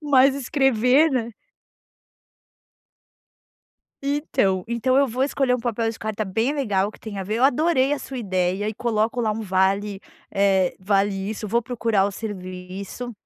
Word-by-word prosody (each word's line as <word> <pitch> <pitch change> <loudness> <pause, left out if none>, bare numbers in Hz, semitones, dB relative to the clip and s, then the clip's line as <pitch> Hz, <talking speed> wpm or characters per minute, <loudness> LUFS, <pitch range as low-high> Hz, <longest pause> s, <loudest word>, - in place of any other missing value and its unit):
mais 275 -2 +5
escrever, 270 +1 +3
né? 235 -4 -2 2.7
Então 275 - 0
então, 255 +2 +1
eu 280 0 +4
vou 250 +3 0
escolher 270 -2 +1
um - - -1
papel 230 -1 -1
de 225 - -10
carta 215 0 -3
bem 225 +7 0
legal 205 -7 0
que - - -17
tem 205 -3 -7
a 190 - -3
ver. 210 +3 -3
Eu 245 - +2
adorei 280 0 +3
a 290 - 0
sua 270 - -8
ideia 190 0 -1
e 220 - -4
coloco 230 +2 0
lá 215 -2 +1
um 220 - -4
vale, 195 +1 0 0.3
eh, 195 -2 +2
vale 195 +1 +1 0.2
isso. 215 0 -5
Eu - - -7
vou 235 +3 +2
procurar 225 -4 +1
o 200 - -1
serviço 190 +3 -7
225 Hz, 165 wpm, -23 LUFS, 195-255 Hz, 2.7 s, mais